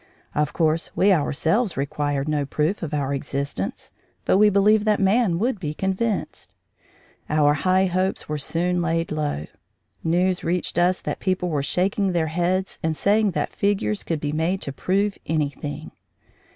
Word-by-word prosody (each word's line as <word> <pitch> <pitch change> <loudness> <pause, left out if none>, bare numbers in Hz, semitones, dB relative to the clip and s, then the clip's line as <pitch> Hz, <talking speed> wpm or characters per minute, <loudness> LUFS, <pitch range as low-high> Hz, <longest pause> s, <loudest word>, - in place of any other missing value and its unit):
Of 150 0 0
course, 160 0 0
we 195 +1 +4
ourselves 170 - +1
required 140 0 -1
no 150 -1 0
proof 150 +7 -1
of 165 - -4
our 140 -2 -1
existence, 140 -7 -4 0.3
but 190 - +3
we 210 0 +7
believed 205 +2 +4
that 210 -1 +2
man 195 -2 +3
would 225 +2 0
be 155 -4 -4
convinced. 195 +4 -2 0.8
Our 150 -1 +4
high 185 +5 +2
hopes 185 +1 -1
were 150 0 -3
soon 175 +5 -1
laid 165 0 -1
low; 150 - -2 0.6
news 180 +2 +1
reached 175 0 -1
us 180 +1 +2
that - - -3
people 185 -1 -1
were 150 -4 0
shaking 190 +6 0
their 160 -2 +1
heads 185 +2 -1
and 160 -1 0
saying 205 -1 +2
that - - -2
figures 205 +1 0
could 165 -2 -2
be 145 0 -2
made 165 +5 0
to 140 - -5
prove 195 +6 0
anything. 145 -2 -3
175 Hz, 160 wpm, -23 LUFS, 150-190 Hz, 0.8 s, we